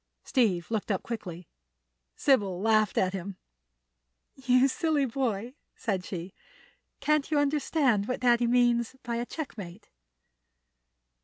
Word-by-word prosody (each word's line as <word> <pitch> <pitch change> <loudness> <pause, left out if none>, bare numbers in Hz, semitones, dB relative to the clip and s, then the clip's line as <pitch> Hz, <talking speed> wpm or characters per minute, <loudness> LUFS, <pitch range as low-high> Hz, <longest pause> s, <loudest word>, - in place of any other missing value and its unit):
Steve 210 -9 +1
looked 220 -1 -2
up 195 -3 0
quickly. 180 -7 -6 0.7
Sybil 200 -10 +2
laughed 215 0 +2
at 185 0 +2
him. 190 0 -5 1.0
"You 260 0 +3
silly 300 0 +1
boy," 240 -2 -2 0.2
said 195 -5 -2
she. 180 0 -6 0.7
"Can't 305 -2 +1
you 305 - +1
understand 280 -6 +1
what 255 - -3
Daddy 240 -1 +4
means 240 0 +2
by 235 -1 -2
a 240 +1 -3
checkmate?" 210 - -7
235 Hz, 115 wpm, -28 LUFS, 195-265 Hz, 1.0 s, Daddy